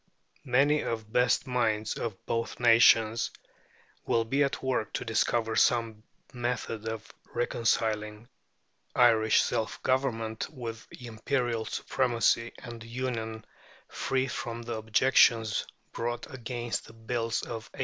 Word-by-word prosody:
Many 140 +4 +3
of 115 -1 -3
the 105 - -23
best 125 +1 +2
minds 110 -4 0
of 110 -5 -5
both 115 0 -2
nations 115 -1 +5 0.7
will 115 -1 +1
be 140 +5 +2
at 140 - -2
work 130 -5 -1
to - - -3
discover 115 0 +1
some 115 -3 +2 0.3
method 120 -3 -3
of 110 -1 -6 0.2
reconciling 110 -2 0 0.7
Irish 110 -3 +5
self 110 - -2
government 115 -4 -1
with 120 -6 -7
imperial 120 0 -2
supremacy 115 -2 +1
and 120 -2 -9
union 115 -2 -4 0.4
free 130 0 -1
from 120 -2 -5
the 120 0 -4
objections 110 0 +3 0.2
brought 120 +1 -3
against 120 -1 -4
the - - -13
Bills 115 0 -2
of 115 -1 -6
1886. - - -14
115 Hz, 120 wpm, -29 LUFS, 110-125 Hz, 0.7 s, nations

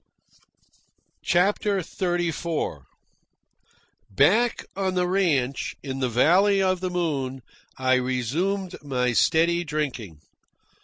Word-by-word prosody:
CHAPTER 200 +3 +1
XXXIV 175 -2 -2 1.2
Back 205 - +2
on 190 -1 -1
the 180 -1 +1
ranch, 155 -9 0
in 135 -1 -5
the 130 -2 0
Valley 180 - +4
of 185 -1 +1
the 185 0 -3
Moon, 140 -8 -2 0.3
I 130 0 +2
resumed 155 - -2
my 125 -3 -1
steady 170 +9 +3
drinking. 130 - -4
165 Hz, 95 wpm, -24 LUFS, 130-185 Hz, 1.2 s, Valley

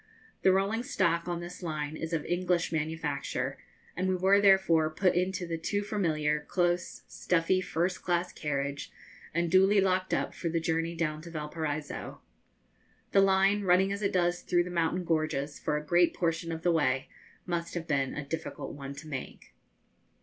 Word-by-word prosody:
The 190 - +5
rolling 195 +4 +1
stock 170 -8 0
on 175 -1 -2
this 175 +2 -8
line 155 -3 -3
is 160 +1 -5
of 160 -3 -1
English 175 0 0
manufacture, 155 -3 -2 0.4
and 185 +2 -1
we 185 - +2
were 190 +2 +4
therefore 190 -6 +5
put 180 +4 +2
into 185 +1 0
the 165 -1 -4
too 205 +5 -1
familiar, 155 -8 0
close, 175 +3 -1
stuffy, 180 +2 +1
first 180 +1 -1
class 175 0 0
carriage, 140 -1 -3 0.4
and 170 0 0
duly 190 +2 +5
locked 185 -1 +1
up - - 0
for 170 - -3
the 165 +1 0
journey 165 +1 -1
down 155 -2 -2
to 170 - -10
Valparaiso. 155 -1 -4 0.9
The 195 - +5
line, 195 +1 +4
running 190 0 +3
as 200 +1 -3
it 200 - +1
does 175 -1 +1
through 175 -1 +1
mountain 175 +1 0
gorges 155 -3 -1
for 150 - -1
a 150 - -5
great 175 +2 +3
portion 165 -1 -1
of 160 0 -5
the 175 - +3
way, 135 -5 +1 0.4
must 170 -1 -3
have 170 -1 -3
been 135 -3 0
a 150 - -4
difficult 160 +3 -5
one 140 -1 -7
to 145 +3 -10
make. 135 - -7
170 Hz, 170 wpm, -30 LUFS, 155-185 Hz, 0.9 s, The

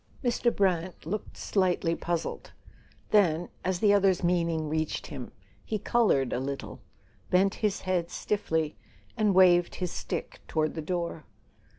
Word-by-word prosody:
Mr. 240 -1 +2
Brant 185 -4 0
looked 200 +6 -4
slightly 180 -4 +1
puzzled; 170 0 -3 0.6
then, 175 -5 +3
as 185 -1 -1
the 205 -1 +5
other's 195 -3 +3
meaning 170 -3 +1
reached 155 +1 -2
him, - - -7 0.3
he 220 - -2
coloured 205 - +2
a - - 0
little, 135 +1 -5 0.5
bent 190 +2 +3
his 210 -3 0
head 180 -2 -1
stiffly, 160 -7 -1 0.4
and 210 -4 +2
waved 175 -2 +5
his 180 -2 -3
stick - - -5
toward 155 -1 0
the 160 - -4
door. 170 -1 -3
180 Hz, 135 wpm, -28 LUFS, 160-195 Hz, 0.6 s, the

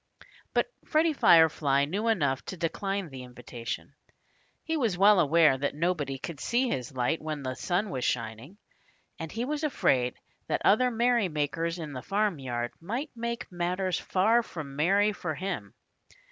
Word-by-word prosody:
But - - +3 0.2
Freddie 315 +1 +2
Firefly 150 - +5
knew 200 +9 -2
enough 140 - +1
to 185 - -6
decline 195 +2 -2
the 130 -1 -8
invitation. 125 -1 -7 0.7
He 320 - -2
was 230 - 0
well 200 +1 +6
aware 160 -3 +5
that 140 +1 -1
nobody 150 -4 -1
could 150 +2 -7
see 245 - +1
his 125 - -3
light 125 +5 0
when 155 -2 -4
the 130 -1 -2
sun 185 +8 -1
was 130 -2 -3
shining. 115 - -3 0.6
And 165 -1 -5
he 230 +2 -2
was 300 +3 -3
afraid 130 - +1 0.3
that - - -1
other 250 +5 +5
merrymakers 175 - 0
in 155 -4 -6
the 130 - -5
farmyard 135 - -1
might 240 - -4
make 235 0 -3
matters 180 +1 -1
far 220 +6 +3
from 155 -10 -8
merry 200 +8 +3
for 160 -5 -4
him. 175 - -5
170 Hz, 155 wpm, -28 LUFS, 140-210 Hz, 0.7 s, well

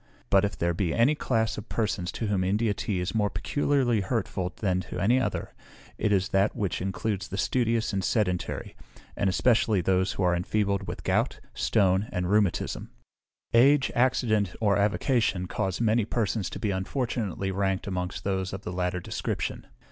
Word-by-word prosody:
"But 100 0 +5
if 100 - -1
there 85 0 +1
be 85 -1 -1
any 120 +6 +4
class 115 -7 0
of 105 - -11
persons 100 -5 -1
to 115 - -3
whom 100 -3 +1
India 105 +3 +1
tea 100 -3 -2
is 90 +1 -2
more 105 -2 +1
particularly 120 +3 +1
hurtful 95 -3 -2
than 95 -4 0
to - - -5
any 120 +6 +3
other, 130 - -2 0.5
it 105 - +1
is 95 -1 +2
that 95 +2 +2
which 100 -4 -2
includes 95 +1 -2
the 95 - -5
studious 115 0 +1
and 95 -1 -1
sedentary, 90 -6 -1 0.4
and 100 - +1
especially 110 +1 +3
those 95 +1 +1
who 95 - -2
are 90 -1 +3
enfeebled 100 +2 0
with - - -6
gout, - - 0
stone, 100 -1 +2
and 90 +1 -1
rheumatism; 105 -3 +1 0.6
age, 135 +4 +5
accident, 115 -6 +2
or 105 -3 +3
avocation, 105 -2 +1
cause 95 +1 -2
many 115 0 +3
persons 110 -2 -1
to - - -6
be 105 - -1
unfortunately 100 -1 -2
ranked 95 0 -1
amongst 90 -2 -3
those 95 -1 -1
of 95 +1 -6
the 90 - -5
latter 90 0 -1
description. - - -3
100 Hz, 170 wpm, -27 LUFS, 95-115 Hz, 0.6 s, But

